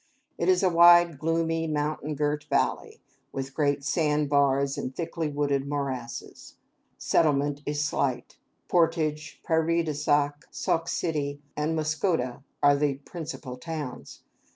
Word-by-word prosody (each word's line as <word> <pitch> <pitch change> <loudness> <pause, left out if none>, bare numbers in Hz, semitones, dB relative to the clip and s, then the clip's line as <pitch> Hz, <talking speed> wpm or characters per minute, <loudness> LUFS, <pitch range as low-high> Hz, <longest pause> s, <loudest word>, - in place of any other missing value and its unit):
It 170 - +1
is 185 +1 +3
a 185 - +5
wide, 170 -2 +6
gloomy, 165 +1 0
mountain 150 0 -2
girt 150 +1 -1
valley, - - -1 0.3
with 135 0 -5
great 145 -1 0
sand 150 -1 +1
bars 140 -1 +2
and 130 +1 -5
thickly 165 -1 -3
wooded 140 -2 -1
morasses. 130 -5 -5 0.4
Settlement 145 -2 +1
is 145 0 0
slight. 130 -4 -2 0.3
Portage, 155 -3 0
Prairie 165 0 +2
du 155 -2 -2
Sac, 145 0 0
Sauk 165 0 -1
City, 145 -4 -2 0.2
and 150 +2 -1
Muscoda 155 -5 -1 0.2
are 145 0 +6
the 140 -1 +1
principal 145 -3 -7
towns. 145 - -7
150 Hz, 130 wpm, -27 LUFS, 140-165 Hz, 0.4 s, wide